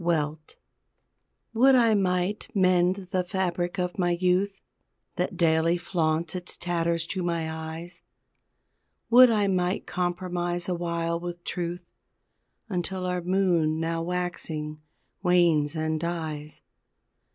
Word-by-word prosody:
WELT 155 -2 -1 1.0
Would 260 +4 +6
I 230 -3 +5
might 185 0 0
mend 185 0 +2
the 185 -1 +1
fabric 180 0 -2
of 180 0 -2
my 175 -1 +2
youth 190 +2 +1 0.6
That - - -2
daily 165 0 +3
flaunts 165 -2 -1
its 180 -1 -2
tatters 170 -1 -1
to 185 +2 -3
my 170 -2 -1
eyes, 160 +2 -6 1.1
Would 250 +1 +9
I 210 -3 +2
might 185 -1 0
compromise 175 -1 -2
awhile 170 -1 -1
with 175 0 -6
truth 175 0 -4 0.8
Until 185 -1 -3
our 180 0 -1
moon 175 -4 +1
now 165 0 -1
waxing, 165 -3 -3 0.4
wanes 170 -5 +3
and 155 0 -1
dies. 155 -3 -4
175 Hz, 115 wpm, -26 LUFS, 165-185 Hz, 1.1 s, Would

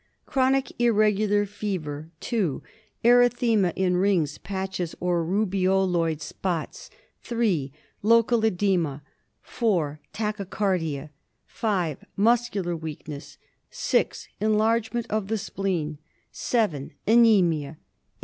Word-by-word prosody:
Chronic 265 0 +1
irregular 210 -2 +3
fever, 165 -7 -4
2. 200 - -1 0.4
Erythema 240 -5 +4
in 180 -1 +1
rings, 180 -6 +1
patches, 190 -3 -4
or 175 -1 +1
rubeoloid 185 -3 +1
spots, 175 -2 -4 0.3
3. 200 - 0 0.3
Local 230 +2 +4
oedema, 180 -9 +1 0.4
4. 170 -11 -1
Tachycardia, 190 -8 -2 0.3
5. 185 - -2
Muscular 210 -5 +1
weakness, 155 -2 -8 0.3
6. - - 0
Enlargement 220 +2 +1
of 215 -2 -1
the 220 +1 0
spleen, 175 -7 -3 0.3
7. 165 - -1
Anemia, 190 -11 +4
8. - - -19
195 Hz, 90 wpm, -25 LUFS, 165-220 Hz, 0.4 s, Erythema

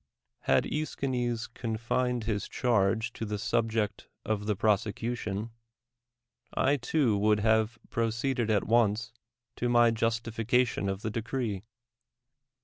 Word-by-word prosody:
Had - - +4
^Eschines 125 -6 -2
confined 120 +1 -1
his 105 -2 -2
charge 110 -1 +1
to - - -6
the 105 -1 -2
sub 115 +2 0
ject 105 -2 -2 0.2
of 105 -1 -1
the 105 - +1
prosecution, 110 +1 -1 1.0
I 140 +2 +3
too 125 -3 +1
would 105 0 +3
have 110 +1 +2
proceed 115 +3 0
ed 115 -2 +1
at 105 -3 +3
once 115 0 +2 0.4
to 120 - 0
my 120 -1 +5
justification 115 0 0
of 95 +1 -4
the 110 - -2
decree. 115 -3 -2
115 Hz, 125 wpm, -29 LUFS, 105-120 Hz, 1.0 s, my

